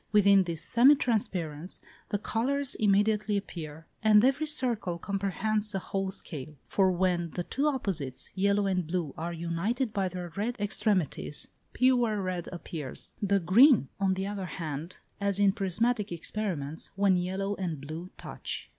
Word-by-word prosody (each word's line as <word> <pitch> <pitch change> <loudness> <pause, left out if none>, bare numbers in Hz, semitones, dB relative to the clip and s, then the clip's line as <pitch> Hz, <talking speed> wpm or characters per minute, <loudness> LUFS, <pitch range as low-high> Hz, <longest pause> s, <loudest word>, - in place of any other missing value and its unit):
Within 200 -2 +5
this 170 -2 -3
semi 260 +5 +6
transparence 180 - -1 0.3
the 205 - 0
colours 270 +7 0
immediately 210 0 +2
appear, 160 -5 -7 0.2
and 215 +1 +6
every 280 +4 +2
circle 240 - 0
comprehends 200 +3 -1
the 195 - -1
whole 195 +1 -2
scale; 155 -6 -7
for 190 -2 +3
when 175 -1 +1
the 175 - -1
two 280 +11 0
opposites, 185 - -1
yellow 200 +1 +2
and 185 -4 0
blue, 165 -4 -2
are 170 +2 -4
united 175 +9 -2
by 195 -2 0
their 175 -2 -7
red 230 +4 -2
extremities, 200 - 0 0.2
pure 245 -4 +3
red 185 -2 -3
appears: 160 -5 -5
the 200 -1 +2
green, 195 - +6
on 190 -1 +2
the 190 +1 -2
other 200 -1 -4
hand, 160 0 -5 0.2
as 200 -1 +1
in 200 -1 +5
prismatic 210 +3 0
experiments, 165 -4 -3
when 195 -1 +3
yellow 190 +3 -1
and 170 -6 -3
blue 155 +6 -7
touch. - - -5
195 Hz, 150 wpm, -29 LUFS, 175-215 Hz, 0.3 s, semi